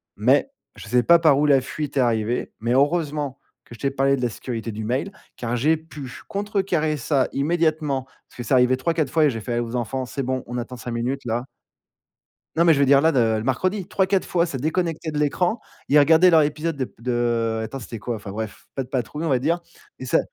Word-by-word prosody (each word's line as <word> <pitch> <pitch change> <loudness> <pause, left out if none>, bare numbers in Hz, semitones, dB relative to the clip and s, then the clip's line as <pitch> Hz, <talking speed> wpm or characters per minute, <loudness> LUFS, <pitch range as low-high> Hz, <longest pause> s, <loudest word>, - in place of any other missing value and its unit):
mais 130 - +3 0.3
je - - -11
sais 125 +3 +3
pas 170 +5 +7
par 155 -4 +4
où 150 - +3
la 140 -2 +5
fuite 145 +2 -5
est - - +4
arrivée. 120 -1 0
Mais 115 +2 -2
heureusement 145 -1 0 0.3
que - - -13
je - - -18
t'ai 140 - 0
parlé 135 0 +2
de 130 - -5
la 120 - +1
sécurité 115 +1 -5
du 110 +1 -5
mail, 130 - -1 0.3
car 120 0 -2
j'ai 150 +7 +3
pu 155 -5 -10 0.2
contrecarrer 190 -7 -1
ça 135 0 +1
immédiatement, 155 -2 0 0.2
puisque 120 -2 -8
c'est - - +1
arrivé 130 0 +4
3-4 160 0 0
fois 160 -2 +4
et - - +4
j'ai 115 -2 -5
fait 120 +2 -2
aux 120 0 -3
enfants: 125 +2 -2
«C'est 135 +2 -4
bon, 130 0 -2
on 120 +1 -5
attend 120 +1 -6
5 120 +1 -6
minutes 120 +4 -2
là». 120 +1 -2 1.1
Non, 170 +1 +3
mais 165 - +7
je - - -1
veux 140 - +5
dire 140 +1 +5
là, 160 +2 +4
de 135 - +2 0.2
le 110 - -3
mercredi 185 - -1
3-4 195 -1 +1
fois, 170 -1 +2
ça 160 -6 -4
déconnectait 160 +2 -1
de 150 - -4
l'écran. 175 - +1 0.3
Ils 145 - +5
regardaient 160 +5 +6
leur 160 -3 +6
épisode 150 +1 -2
de 130 - -1
p - - -18
de 125 +1 -2
heu, 115 -2 0
attends, 125 +5 -6
c'était 115 -1 -7
quoi? 120 +2 -3
Enfin 105 -2 -8
bref, 110 0 -6
Pat 135 -2 -3
Patrouille, 135 +5 -3
on - - 0
va 130 -3 +3
dire. 165 +7 +1 0.4
Et - - -6
ça - - +3
135 Hz, 235 wpm, -23 LUFS, 120-160 Hz, 1.1 s, pas